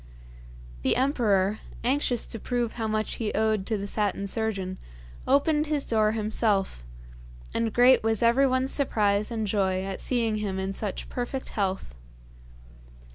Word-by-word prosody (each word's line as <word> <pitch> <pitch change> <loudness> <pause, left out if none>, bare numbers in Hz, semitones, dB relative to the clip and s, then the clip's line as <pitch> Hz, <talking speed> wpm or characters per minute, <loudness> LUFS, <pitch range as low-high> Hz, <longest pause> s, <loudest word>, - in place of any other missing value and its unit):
The - - +2
emperor, 220 -7 +1 0.2
anxious 250 -1 +1
to 225 - -4
prove 240 0 -2
how 225 -2 -1
much 215 0 -2
he 215 - -1
owed 215 -2 +1
to 220 - 0
the 200 - -4
Satin 200 -1 -1
Surgeon, 195 -3 -1 0.5
opened 295 +3 +2
his 295 -2 0
door 215 -1 +2
himself, 210 - 0 0.7
and 230 -1 0
great 250 +3 +5
was 225 0 +1
everyone's 260 +2 +3
surprise 210 -6 +1
and 225 -2 -2
joy 190 -2 0
at 195 0 -5
seeing 230 -4 0
him 200 -3 -3
in 190 +1 -2
such 200 -1 -4
perfect 255 +2 -4
health. 190 - -2
220 Hz, 140 wpm, -26 LUFS, 200-245 Hz, 0.7 s, great